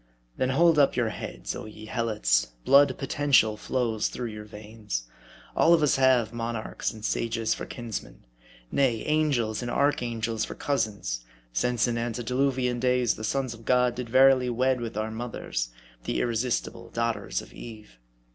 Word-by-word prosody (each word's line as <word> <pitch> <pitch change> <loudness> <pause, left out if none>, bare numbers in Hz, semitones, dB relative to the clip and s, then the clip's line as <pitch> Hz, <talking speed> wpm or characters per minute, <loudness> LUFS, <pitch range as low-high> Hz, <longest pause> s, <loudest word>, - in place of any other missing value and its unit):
Then 130 - 0
hold 165 +3 +4
up 140 - +4
your 120 -3 +1
heads, - - -6
oh - - -6
ye 110 0 -10
Helots, - - 0
blood 140 +1 +6
potential 135 -6 +3
flows 115 -1 -1
through 120 -2 -4
your 105 -1 -8
veins. 105 - -6 0.5
All 170 - +6
of 160 - +1
us 145 - +3
have 125 -4 +3
monarchs 115 -1 -3
and 110 -1 -8
sages 115 -1 0
for - - -6
kinsmen; 120 - -7 0.5
nay, 125 -5 +2
angels 140 -8 +1
and 120 - -4
archangels 115 -5 0
for - - -5
cousins; 100 - -2 0.3
since 120 - +1
in 115 -1 -1
antediluvian 125 +2 0
days, 125 -1 +2
the 110 - -8
sons 130 +2 -1
of 115 0 -13
God 125 0 +3
did 120 -1 -6
verily 130 0 +5
wed 125 +1 +1
with 115 -2 -5
our 110 +1 -2
mothers, 110 - -4 0.4
the - - -1
irresistible 120 +1 -1
daughters 115 0 -2
of - - -15
Eve. 105 - -11
120 Hz, 155 wpm, -27 LUFS, 110-130 Hz, 0.5 s, blood